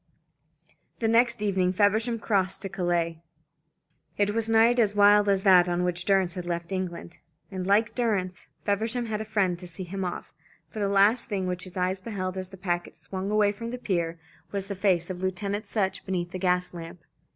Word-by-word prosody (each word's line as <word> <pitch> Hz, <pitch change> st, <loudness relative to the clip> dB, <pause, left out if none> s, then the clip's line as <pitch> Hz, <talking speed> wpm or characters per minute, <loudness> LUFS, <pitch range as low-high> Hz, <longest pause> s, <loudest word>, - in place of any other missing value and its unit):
The 225 Hz, -, 0 dB
next 235 Hz, 0 st, +3 dB
evening 185 Hz, -3 st, +1 dB
Feversham 220 Hz, +4 st, +2 dB
crossed 195 Hz, -4 st, 0 dB
to 195 Hz, -, -4 dB
Calais. 170 Hz, -3 st, -1 dB, 1.0 s
It 205 Hz, 0 st, +1 dB
was 225 Hz, 0 st, -1 dB
a -, -, +1 dB
night 230 Hz, +2 st, +5 dB
as 210 Hz, -3 st, +2 dB
wild 205 Hz, 0 st, +6 dB
as 195 Hz, -1 st, +2 dB
that 180 Hz, -3 st, +6 dB
on 175 Hz, 0 st, 0 dB
which 180 Hz, 0 st, -1 dB
Durrance 190 Hz, -3 st, +2 dB
had 180 Hz, -2 st, -6 dB
left 170 Hz, +1 st, -3 dB
England; 175 Hz, -3 st, -5 dB, 0.3 s
and, 185 Hz, -1 st, -4 dB
like 210 Hz, +2 st, +3 dB
Durrance, 200 Hz, -7 st, -1 dB, 0.2 s
Feversham 225 Hz, +4 st, 0 dB
had 215 Hz, -1 st, -3 dB
a -, -, -4 dB
friend 195 Hz, -5 st, 0 dB
to 180 Hz, -, -9 dB
see 175 Hz, +2 st, -8 dB
him 190 Hz, +2 st, -5 dB
off, 180 Hz, -1 st, -5 dB, 0.3 s
for 165 Hz, +7 st, -8 dB
the 200 Hz, -1 st, 0 dB
last 205 Hz, +5 st, +4 dB
thing 195 Hz, -3 st, -1 dB
which 180 Hz, +1 st, -3 dB
his 185 Hz, +1 st, -9 dB
eyes 185 Hz, +1 st, 0 dB
beheld 185 Hz, -4 st, -4 dB
as 185 Hz, -1 st, -4 dB
the 195 Hz, -, -12 dB
packet 175 Hz, -2 st, -3 dB
swung 190 Hz, +1 st, -5 dB
away 210 Hz, -1 st, +3 dB
from 230 Hz, +3 st, -6 dB
the 250 Hz, -, -4 dB
pier, 170 Hz, -7 st, -2 dB, 0.3 s
was 200 Hz, -1 st, -3 dB
the 200 Hz, -, -4 dB
face 185 Hz, -2 st, +1 dB
of 180 Hz, -1 st, -7 dB
Lieutenant 200 Hz, +3 st, -2 dB
Sutch 195 Hz, -2 st, -1 dB
beneath 175 Hz, -2 st, -3 dB
a 185 Hz, -, -4 dB
gas 180 Hz, -1 st, +1 dB
lamp. 165 Hz, 0 st, -9 dB
190 Hz, 200 wpm, -27 LUFS, 180-210 Hz, 1.0 s, wild